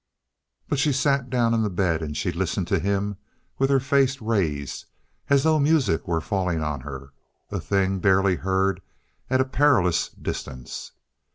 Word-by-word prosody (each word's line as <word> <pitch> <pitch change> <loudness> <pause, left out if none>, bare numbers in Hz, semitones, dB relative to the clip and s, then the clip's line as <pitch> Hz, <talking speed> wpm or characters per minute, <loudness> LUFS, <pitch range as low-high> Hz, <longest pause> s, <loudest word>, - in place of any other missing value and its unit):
But 145 - -1
she 145 +1 +2
sat 140 -1 +1
down 120 -2 +2
on 115 - +2
the 105 - 0
bed, 90 -3 0
and 75 -2 -4
she 90 - -1
listened 90 +1 -2
to - - +2
him 100 +1 -1 0.4
with 135 0 +2
her 135 -1 +4
face 135 0 +2
raised, 85 - -2 0.4
as 140 -1 +4
though 160 -1 +3
music 145 - +2
were 85 -2 +1
falling 90 -4 -1
on 75 -3 -3
her, 70 -1 -9 0.4
a - - -2
thing 95 -1 0
barely 95 -1 +3
heard 95 0 0 0.5
at 130 0 +3
a - - +1
perilous 130 - +2
distance. 65 -2 -7
100 Hz, 165 wpm, -24 LUFS, 85-130 Hz, 0.5 s, her